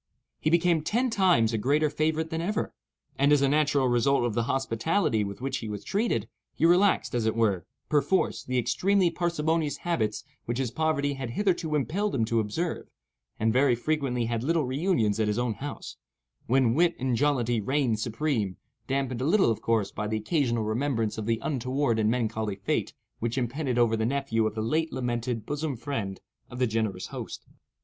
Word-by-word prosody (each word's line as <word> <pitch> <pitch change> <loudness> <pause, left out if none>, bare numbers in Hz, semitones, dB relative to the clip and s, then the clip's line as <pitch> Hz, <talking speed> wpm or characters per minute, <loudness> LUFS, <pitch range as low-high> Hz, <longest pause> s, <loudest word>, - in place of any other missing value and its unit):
He 155 - +1
became 170 -1 +3
ten 240 +10 0
times 180 - +3
a 110 - 0
greater 145 +7 +2
favorite 160 +2 0
than 160 0 -2
ever, 210 +5 -2 0.5
and, 140 +1 +4
as 145 -1 +5
a - - +4
natural 145 -2 +2
result 120 +1 +2
of 120 - -1
the 115 +1 0
hospitality 135 - +1
with 100 +3 -6
which 135 +1 -2
he 110 - -6
was 105 -1 -5
treated, 220 +4 0 0.3
he 165 - +2
relaxed, 180 +4 +3
as 115 -2 0
it 110 - 0
were, 105 -6 +1 0.2
perforce, 150 +5 +1
the 130 0 -2
extremely 185 - +2
parsimonious 165 -2 0
habits 110 -12 -1 0.2
which 120 +1 -2
his 130 -4 -1
poverty 145 0 0
had 135 -3 -5
hitherto 170 - 0
impelled 185 +8 0
him 115 -4 +1
to 115 +1 +1
observe, 155 +11 -3 0.5
and 110 0 +2
very 130 0 +4
frequently 125 -2 -1
had 115 -1 -1
little 160 +1 +1
reunions 130 - +1
at 110 - +2
his 105 +1 0
own 120 -2 0
house, 140 +7 -7 0.5
when 125 -1 +3
wit 170 +4 +3
and 130 -1 0
jollity 120 -4 +1
reigned 130 -2 0
supreme—dampened 125 +1 -2
a - - 0
little, 185 - +4
of 110 - -3
course, 110 -4 +1
by 105 0 -3
the 110 +1 -1
occasional 120 0 0
remembrance 115 -1 -1
of 110 - -4
the 115 -1 +2
untoward 130 -3 0
and 110 0 +2
melancholy 110 -3 -1
fate - - -2 0.2
which 115 +2 -2
impended 130 +1 -1
over 120 -2 +3
the 110 0 0
nephew 125 -5 0
of 110 - -5
the 110 - -2
late 160 +8 0
lamented 120 -3 -2
bosom 145 0 -2
friend 110 -8 -4 0.3
of 125 - -8
the 125 - +2
generous 110 -5 -1
host. - - -7
130 Hz, 185 wpm, -27 LUFS, 115-155 Hz, 0.5 s, as